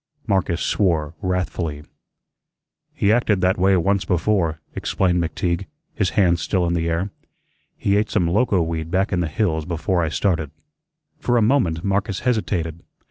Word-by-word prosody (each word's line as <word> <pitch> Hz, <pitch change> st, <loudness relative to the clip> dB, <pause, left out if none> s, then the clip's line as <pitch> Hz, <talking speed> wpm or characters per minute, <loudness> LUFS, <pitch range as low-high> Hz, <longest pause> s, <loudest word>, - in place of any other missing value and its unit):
Marcus 95 Hz, -5 st, 0 dB
swore 80 Hz, -6 st, +1 dB
wrathfully. 90 Hz, -5 st, -2 dB, 1.1 s
"He 100 Hz, -, +1 dB
acted 110 Hz, -5 st, +2 dB
that 90 Hz, 0 st, +2 dB
way 95 Hz, +1 st, +4 dB
once 100 Hz, +3 st, +1 dB
before," 85 Hz, -3 st, 0 dB
explained 90 Hz, -2 st, 0 dB
McTeague, 85 Hz, +2 st, -2 dB, 0.3 s
his 100 Hz, -4 st, 0 dB
hands 85 Hz, -4 st, +3 dB
still 95 Hz, -3 st, 0 dB
in 85 Hz, -, 0 dB
the 85 Hz, -1 st, 0 dB
air. 85 Hz, +4 st, -1 dB, 0.7 s
"He 100 Hz, 0 st, +1 dB
ate 105 Hz, +1 st, +1 dB
some 90 Hz, -5 st, +1 dB
loco 100 Hz, 0 st, +2 dB
weed 80 Hz, -1 st, -3 dB
back 95 Hz, +3 st, 0 dB
in 90 Hz, -, +1 dB
the 85 Hz, -, 0 dB
hills 80 Hz, -1 st, 0 dB
before 85 Hz, +2 st, -1 dB
I 80 Hz, -, 0 dB
started." 80 Hz, -3 st, 0 dB, 0.7 s
For 120 Hz, 0 st, +1 dB
a 115 Hz, -, +4 dB
moment 105 Hz, -10 st, +2 dB
Marcus 100 Hz, 0 st, -1 dB
hesitated. 95 Hz, -9 st, -1 dB
90 Hz, 155 wpm, -22 LUFS, 85-100 Hz, 1.1 s, way